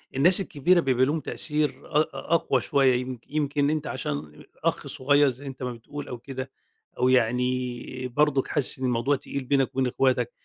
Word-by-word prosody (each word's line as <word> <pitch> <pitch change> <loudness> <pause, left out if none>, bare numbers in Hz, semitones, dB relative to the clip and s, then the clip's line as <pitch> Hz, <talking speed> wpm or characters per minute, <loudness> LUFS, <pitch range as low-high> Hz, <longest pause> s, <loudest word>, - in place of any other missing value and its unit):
الناس 175 +8 +5
الكبيرة 175 +2 +2
بيبقى 130 -4 +2
ليهم 150 +4 0
تأثير 150 +1 -1
أق 150 +1 0
أقوى 155 -6 +1
شوية 135 -2 +3
يم 130 -1 -6
يمكن 145 -1 0
أنت 155 0 -1
عشان 75 +1 -5 0.2
أخ - - 0
صغير 145 +1 +3
زي 130 +3 -8
أنت 130 -1 -7
ما 125 -1 -3
بتقول 140 +5 -8
أو 125 - -6
كده 130 +1 -7 0.5
أو 125 - +3
يعني 125 +1 0
برضك 140 +1 +1
حاسس 140 -3 0
إن 130 - -2
الموضوع 125 +3 +1
تقيل 140 0 -5
بينك 135 0 +2
وبين 130 -1 +2
إخواتك، 130 - +1
135 Hz, 170 wpm, -26 LUFS, 125-145 Hz, 0.5 s, الناس